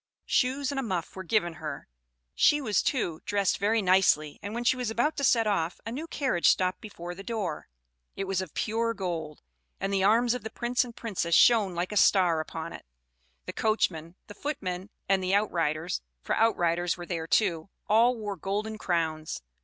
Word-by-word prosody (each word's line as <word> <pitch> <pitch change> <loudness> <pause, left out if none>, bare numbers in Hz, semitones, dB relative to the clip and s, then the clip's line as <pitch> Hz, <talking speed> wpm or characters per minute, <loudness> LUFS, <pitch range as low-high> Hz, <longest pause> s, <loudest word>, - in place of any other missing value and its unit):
Shoes 265 +2 +1
and 275 - -2
a - - 0
muff 185 -9 -3
were 190 - -5
given 175 -2 0
her; 150 -3 -6 0.5
she 295 - +4
was, 220 -8 +1
too, 175 - -1
dressed 200 -3 0
very 215 +2 +2
nicely; 180 -5 +3
and 205 +2 -6
when 240 - -2
she 250 - +3
was 250 -3 -2
about 240 +8 0
to 280 - -2
set 235 -4 +4
off, 180 -5 0
a 225 - -4
new 295 +7 -5
carriage 265 - +1
stopped 185 0 +1
before 175 -6 -7
the 185 - -9
door. 195 -7 -4 0.5
It 195 - -3
was 190 -1 -1
of 185 -5 -8
pure 230 +1 0
gold, 165 -6 -4 0.4
and 195 +1 -2
the 195 -1 +2
arms 230 +4 +4
of 250 -4 -5
the 220 - -5
Prince 240 +3 0
and 240 -2 -10
Princess 180 -7 -1
shone 215 -7 +5
like 175 +3 -2
a 210 - -1
star 180 -5 +4
upon 155 - -5
it; - - -11 0.6
the - - -5
coachman, 175 -7 0
the 205 - -10
footmen, 195 -9 -4 0.2
and 190 -1 +2
the 185 +2 +2
outriders, 170 -5 0 0.2
for - - -1
outriders 175 -6 +1
were 175 - -7
there, 165 -2 -4
too, 170 -3 +1 0.2
all 230 +4 +4
wore 205 -2 -4
golden 210 +5 -3
crowns. 160 - -2
195 Hz, 195 wpm, -28 LUFS, 175-230 Hz, 0.6 s, shone